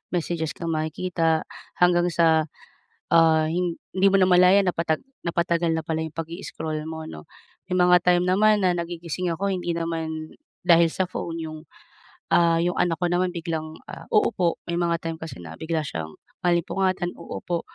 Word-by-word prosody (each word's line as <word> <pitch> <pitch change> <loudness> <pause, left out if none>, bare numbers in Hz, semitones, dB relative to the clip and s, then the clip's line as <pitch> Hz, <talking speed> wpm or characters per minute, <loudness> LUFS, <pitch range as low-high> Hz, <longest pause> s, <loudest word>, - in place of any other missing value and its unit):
messages 165 -2 -2
kang 165 -1 -4
makikita 160 +1 0 0.4
hanggang 175 0 +4
sa, 160 -2 +3 0.7
ah, 160 -1 +5
hindi 180 +3 0
mo 195 - +4
namalayan 185 +1 +5
napatag 165 -3 0 0.2
napatagal 170 -1 0
na 160 - 0
pala 160 0 -2
'yong 160 -1 -7
pag-i-scroll 160 -2 -5
mo, 160 0 -6
'no? 75 - -9 0.5
May 185 - +2
mga 180 0 +6
time 175 0 +4
naman 210 +2 +4
na 180 - +2
nagigising 170 0 -3
ako 180 +5 -2
hindi 180 -3 -1
naman 160 -2 -4 0.3
dahil 170 -2 +4
sa 185 -1 -1
phone 165 -2 -5
'yong, 155 -1 -6 0.7
ah, 170 -1 +4
'yong 175 +2 +1
anak 165 -2 +1
ko 180 - -1
naman 180 +1 +1
biglang, 160 -2 -5
ah, - - -10
uupo. 180 -5 +2
May 170 - -4
mga 170 -1 +1
time 165 0 -3
kasi 160 - -7
na 85 -2 -9
bigla 160 - -3
siyang 80 - -6 0.2
maalimpungatan 175 +1 0
uupo, 170 -1 -4
170 Hz, 160 wpm, -24 LUFS, 160-180 Hz, 0.7 s, mga